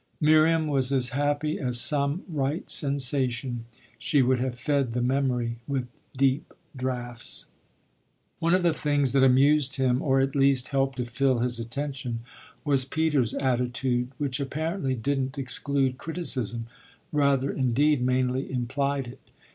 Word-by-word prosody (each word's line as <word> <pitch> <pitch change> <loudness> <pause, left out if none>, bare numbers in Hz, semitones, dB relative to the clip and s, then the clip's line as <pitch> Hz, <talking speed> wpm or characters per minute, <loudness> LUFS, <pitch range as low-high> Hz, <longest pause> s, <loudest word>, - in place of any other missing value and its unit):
Miriam 155 +1 +4
was 135 -3 +1
as 130 -2 +2
happy 145 +2 -1
as 125 -2 +2
some 145 +5 +2
right 150 -1 -2
sensation 130 -4 0 0.3
she 145 -4 +2
would 130 0 +2
have 125 -1 -2
fed 135 -3 0
the 125 - -1
memory 125 -3 0
with 135 -3 -1 0.3
deep 135 +2 0 0.2
draughts. 125 -2 -4 0.9
One 170 +2 +3
of 185 - +1
the 170 -2 +3
things 145 -4 0
that 135 - +4
amused 135 +1 +4
him 130 -2 +1
or 135 -2 +2
at 135 +1 0
least 135 -2 +2
helped 135 -1 0
to 125 - -2
fill 130 +2 +1
his 120 0 -1
attention 130 0 -4 0.4
was 140 -3 +3
Peter's 145 -3 0
attitude, 125 -1 0
which 140 -2 -2
apparently 150 +1 -2
didn't 135 +3 -2
exclude 135 0 0
criticism 130 - -1 0.5
rather 140 -2 +2
indeed 135 +2 +2
mainly 130 +1 0
implied 135 +2 -1
it. 120 - -11
135 Hz, 140 wpm, -26 LUFS, 125-145 Hz, 0.9 s, Miriam